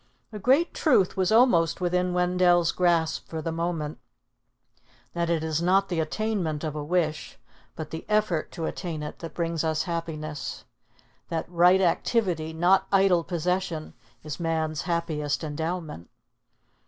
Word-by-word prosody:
A 210 - -5
great 270 - +3
truth 245 - +3
was 185 0 +1
almost 180 -9 +4
within 180 0 0
Wendell's 180 -1 +3
grasp 170 -3 +1
for 160 - -5
the 165 +1 -3
moment, 165 -2 -3 1.1
that 170 0 -1
it 165 -2 +1
is 160 0 -1
not 195 +3 +3
the 175 -3 -1
attainment 165 -2 -2
of 155 -2 -3
a 150 - -3
wish, 155 -2 -1 0.4
but 160 - -7
the 160 - -5
effort 210 -7 +1
to 165 - -4
attain 160 -4 -4
it 150 - -7
that 165 -2 -8
brings 165 -2 -1
us 160 -1 0
happiness: 155 - -5 0.6
that 165 -1 -2
right 180 +2 +4
activity, 175 -3 +1
not 180 +4 +3
idle 190 -3 +4
possession, 175 -2 -2 0.3
is 155 +1 -6
man's 160 -2 -1
happiest 160 -3 -1
endowment. 160 - -4
170 Hz, 140 wpm, -26 LUFS, 160-180 Hz, 1.1 s, almost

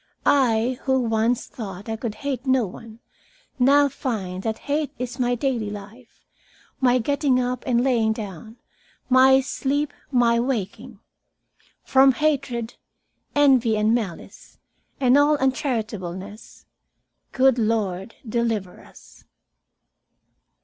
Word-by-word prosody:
I, 250 -2 +2
who 265 -1 +2
once 230 +1 0
thought 200 -3 -8
I 225 - -2
could 220 -1 -5
hate 275 -1 -3
no 260 -3 +3
one, 225 +4 -11 0.6
now 280 +3 +5
find 200 -9 -4
that 220 +1 -3
hate 290 0 -1
is 250 +1 -6
my 245 0 +1
daily 240 -4 -2
life, 210 +4 -12 0.5
my 255 -1 +3
getting 275 +1 +1
up 250 -1 -2
and 240 -1 +2
lying 235 -4 +2
down, 215 0 -7 0.5
my 265 +1 +6
sleep, 285 +2 -2 0.2
my 235 -3 +3
waking. 235 -2 -4 0.8
"'From 265 0 +5
hatred, 245 -6 -1 0.6
envy, 260 -6 +4
and 215 +1 +2
malice, 210 -8 -5 0.4
and 260 +1 +4
all 295 +1 +4
uncharitableness, 215 - -4 0.7
Good 260 -2 +3
Lord, 215 -3 -1
deliver 220 -5 -2
us.' - - -18
240 Hz, 115 wpm, -23 LUFS, 220-265 Hz, 0.8 s, my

